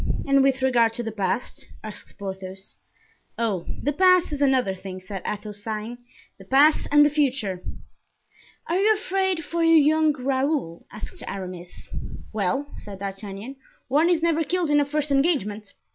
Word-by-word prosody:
"And 275 0 +5
with 270 -1 +2
regard 235 -3 +3
to 240 - -4
the 225 - -4
past?" 205 +2 -3
asked 215 -1 -8
Porthos. 190 -1 -7 0.6
"Oh! 210 -7 -1 0.2
the 290 - +1
past 365 +1 +4
is 290 -1 -4
another 260 -8 +3
thing," 185 0 -8
said 190 0 -7
Athos, 210 0 -5
sighing; 220 +2 -5 0.4
"the - - -11
past 285 +8 +4
and 295 0 +7
the - - +4
future." 260 -11 0 1.1
"Are 345 +3 +1
you 430 +2 +4
afraid 380 -4 -1
for 335 +2 -1
your 330 0 +6
young 310 +1 +4
Raoul?" 265 - -1
asked 215 - -8
Aramis. 180 -2 -7 0.5
"Well," 215 +7 0
said 200 -2 -9
D'Artagnan, 200 +5 -7 0.3
"one 305 +6 +4
is 335 -2 +2
never 330 -1 +2
killed 340 0 0
in 295 - +5
a 290 - +2
first 295 0 -2
engagement." 265 - 0
260 Hz, 160 wpm, -24 LUFS, 200-300 Hz, 1.1 s, and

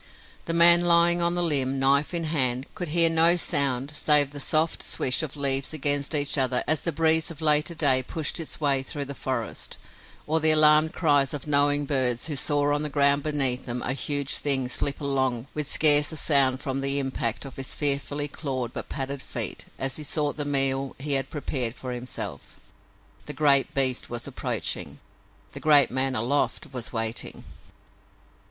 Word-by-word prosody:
The 165 - -3
man 170 +1 +7
lying 170 0 +4
along 170 0 +1
the 175 - -1
limb, 135 -5 0
knife 140 +2 +2
in 170 -2 -3
hand, 130 -5 0
could 180 - -6
hear 165 +2 +4
no 165 +1 +4
sound 140 -5 +1
save 150 -2 +4
the 145 - -8
soft 155 +3 0
swish 125 +4 0
of 155 -2 -7
leaves 135 0 -1
against 145 0 -1
each 145 0 +1
other 130 -1 0
as 155 -1 +2
the 170 - -2
breeze 160 +1 +2
of 165 -3 -10
later 150 +1 +2
day 140 -5 +4
pushed 155 +5 -3
its 165 - -6
way 140 -3 +1
through 140 +1 -5
the 140 - -6
forest, 130 -4 -5 0.5
or 160 +2 +1
the 160 0 +5
alarmed 155 0 +5
cries 145 -4 0
of 145 - -8
knowing 145 0 +1
birds 130 -4 -1
who 150 -2 -3
saw 145 +1 0
on 145 - -1
the 150 - -2
ground 140 0 +1
beneath 135 -4 0
them 120 0 -3
a 130 - -2
huge 140 0 -2
thing 135 -3 0
slip 140 +3 -2
along 130 -4 -2
with 150 -2 -4
scarce 150 -1 +5
a 160 - -6
sound 135 -3 +1
from 135 -2 -4
the 140 +1 -1
impact 130 -3 -3
of 135 - -11
his 135 -1 -3
fearfully 145 0 -1
clawed 130 -5 -6
but - - -8
padded 140 0 -4
feet - - -3
as 135 0 -2
he 155 - -7
sought 150 0 -2
the 145 - -4
meal 135 -1 0
he 145 +2 -2
had 135 -1 +1
prepared 130 -5 -3
for 130 -1 -8
himself. 120 - -7 0.7
The - - -5
great 145 0 +2
beast 130 -2 0
was 120 0 -5
approaching. - - -5 0.5
The - - -9
great 145 -4 +4
man 130 +1 0
aloft 130 +5 -2
was 125 -2 -5
waiting. 115 0 -3
140 Hz, 185 wpm, -24 LUFS, 135-150 Hz, 0.7 s, man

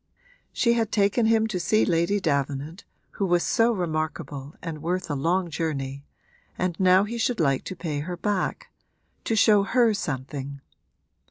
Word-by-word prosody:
She 235 - +2
had 225 -2 0
taken 210 +3 +2
him 225 -1 +3
to 215 -5 -2
see 215 +6 +2
Lady 170 +4 +1
Davenant, 145 +1 -2 0.3
who 200 - -2
was 175 -1 +2
so 230 0 +3
remarkable 155 - -3
and 160 -4 -6
worth 175 +1 -2
a - - -1
long 170 +5 0
journey, 140 -3 -3 0.5
and 180 -2 -1
now 185 0 +5
he 230 +3 -4
should 235 -1 0
like 135 -5 +2
to 185 - -5
pay 160 -5 -3
her 175 +4 -5
back 210 - -2 0.5
to 225 - 0
show 210 -1 +5
her 230 +2 +3
something. 140 -4 -4
175 Hz, 160 wpm, -25 LUFS, 150-210 Hz, 0.5 s, now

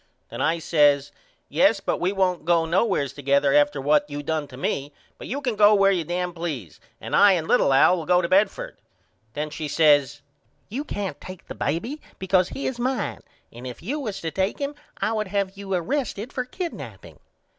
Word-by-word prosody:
Then - - -6
I 165 +2 +2
says 145 -3 +3 0.4
Yes 195 +8 +3
but - - -2
we 180 +2 +1
won't 185 -4 0
go 165 0 +2
nowheres 170 - +1
together 140 0 +2
after 145 -1 +3
what 145 +2 +2
you 145 0 -5
done 155 0 -2
to 130 -2 -12
me 140 +1 -2 0.3
but - - -8
you 280 +3 -3
can 250 -5 -1
go 210 0 +6
where 195 -1 +4
you 180 -4 0
dam 175 +2 -3
please 150 - -5 0.2
and - - -3
I 200 -1 +7
and 165 -3 -1
little 245 - +3
Al 135 +7 +5
will 160 - -6
go 180 0 +4
to 175 - 0
Bedford. 195 +3 +1 0.6
Then 150 +1 -4
she 150 +1 -5
says 145 -2 +3 0.5
You 255 +8 -3
can't 195 - -5
take 185 -1 -10
the - - -7
baby 225 - -3 0.2
because 185 -1 +2
he 275 - -5
is 250 -2 -3
mine 250 -2 -2 0.3
and 120 +2 -8
if 125 +4 -9
you 275 - -3
was 215 -8 -4
to 165 - -3
take 190 +3 -1
him 285 0 -3 0.2
I - - -1
would 215 -2 -1
have 195 0 -2
you 195 0 -8
arrested 235 - -3
for 255 -2 -2
kidnaping. 340 +7 -7
180 Hz, 200 wpm, -24 LUFS, 145-205 Hz, 0.6 s, I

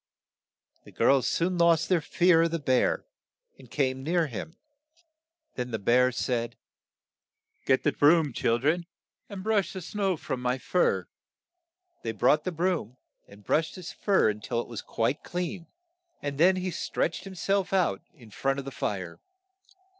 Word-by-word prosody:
The - - -15
girls 135 -2 +3
soon 175 +1 0
lost 170 -1 +4
their 180 -3 +2
fear 175 +1 +3
of 165 - +2
the 165 - -1
bear, 130 -5 +1 0.5
and 130 -3 -15
came 130 -1 -1
near 165 +4 +1
him. 155 - -7 1.0
Then 125 -1 -4
the 110 - -2
bear 125 +5 +3
said, 120 -1 -2 1.1
"Get 130 -1 +3
the 150 - +3
broom, 150 -1 +4
chil 115 +1 +1
dren, 160 +7 0 0.4
and 195 -2 -7
brush 210 -5 +1
the 190 - -5
snow 195 0 -1
from 130 -3 -4
my 125 +1 0
fur." 180 +7 +1 1.0
They 115 - -3
brought 130 +7 +3
the 185 - -1
broom, 165 - -1 0.3
and 100 +1 -16
brushed 160 +1 +1
his 180 -3 -7
fur 190 - +2
till 115 +3 -4
it - - -4
was 115 -3 -6
quite 115 +5 -1
clean, 180 0 -4 0.5
and 140 -1 -5
then 185 +3 +6
he 185 0 -2
stretched 175 +2 -2
him 190 - -9
self 195 +1 0
out 185 -5 +1
in 115 -9 -17
front 135 +5 -1
of 140 - -5
the 135 - -6
fire. 95 -8 -4
155 Hz, 160 wpm, -27 LUFS, 125-180 Hz, 1.1 s, then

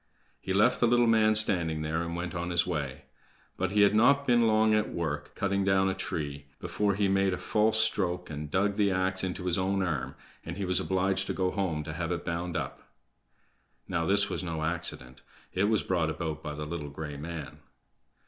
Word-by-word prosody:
He - - -5
left 100 +2 +3
the 120 - +4
little 120 +1 +4
man 110 -1 +4
standing 85 -7 +4
there, 80 +2 -1
and 85 0 -4
went 85 -1 -4
on 85 0 -3
his 85 -1 +2
way. 70 -5 -4 0.5
But 95 0 -1
he 105 +2 +2
had 100 - +4
not 140 +6 +4
been 120 -2 +4
long 110 0 +3
at 105 0 +1
work, 75 -4 -4
cutting 100 -1 0
down 95 0 +2
a - - -2
tree, 70 -6 -5
before 100 -2 -1
he 100 0 +1
made 95 0 +2
a - - -2
false 110 +1 +1
stroke, 90 -5 +1
and 75 0 -6
dug 100 +5 0
the 105 -2 +3
ax 95 0 0
into 90 0 -3
his 90 0 +1
own 95 +1 0
arm, 70 -7 -3 0.3
and 85 +2 -7
he 100 - -2
was 90 0 +1
obliged 95 0 0
to - - -1
go 95 -1 0
home 85 -6 -2
to 75 0 -6
have 85 +2 -3
it 90 - -3
bound 85 0 -3
up. - - -5 1.1
Now, 85 -1 -1
this 100 +1 +5
was - - -4
no 80 -3 -3
accident; 80 -6 -4 0.3
it 95 +2 +1
was 110 -1 +1
brought 85 -4 0
about 80 -1 -4
by 75 -1 -6
the 75 0 -5
little 75 -2 -5
gray 75 +1 -7
man. 75 -2 -7
90 Hz, 210 wpm, -29 LUFS, 80-100 Hz, 1.1 s, this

